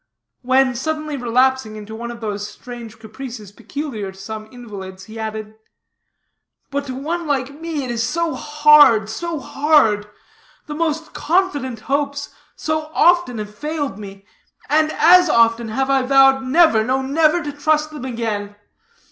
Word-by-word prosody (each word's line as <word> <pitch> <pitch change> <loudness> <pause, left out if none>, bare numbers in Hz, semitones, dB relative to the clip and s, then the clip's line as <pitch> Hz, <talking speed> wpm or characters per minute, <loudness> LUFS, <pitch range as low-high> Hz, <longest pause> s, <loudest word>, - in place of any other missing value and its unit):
When 260 +1 +3
suddenly 305 +4 -3
relapsing 250 -2 +1
into 215 0 -9
one 235 +1 -6
of 235 0 -9
those 205 -1 -4
strange 235 0 -10
caprices 220 -2 -9
peculiar 230 -2 -6
to 190 - -18
some 215 +2 -8
invalids, 195 -6 -9
he 220 +3 -10
added: 220 -1 -5 1.2
"But 280 0 -3
to 255 - -5
one 325 +5 -3
like 280 +1 -2
me, 325 -4 -3
it 245 - -4
is 235 -1 -2
so 330 +8 -1
hard, 295 -8 +5
so 335 +7 -4
hard. 265 -9 +2 0.6
The 300 - -6
most 320 0 -2
confident 290 - -1
hopes 285 +1 -2 0.2
so 310 0 -3
often 345 -8 +3
have 210 -1 -6
failed 290 -2 -4
me, 195 -1 -10 0.4
and 310 +1 +3
as 360 +2 +6
often 230 -2 +3
have 265 +5 -1
I 270 -1 +3
vowed 270 +1 +5
never, 260 -5 +4
no, 260 +3 0
never, 310 +5 +2
to 295 - -4
trust 305 +1 0
them 300 -4 -8
again. 220 -4 -4
260 Hz, 150 wpm, -20 LUFS, 220-300 Hz, 1.2 s, as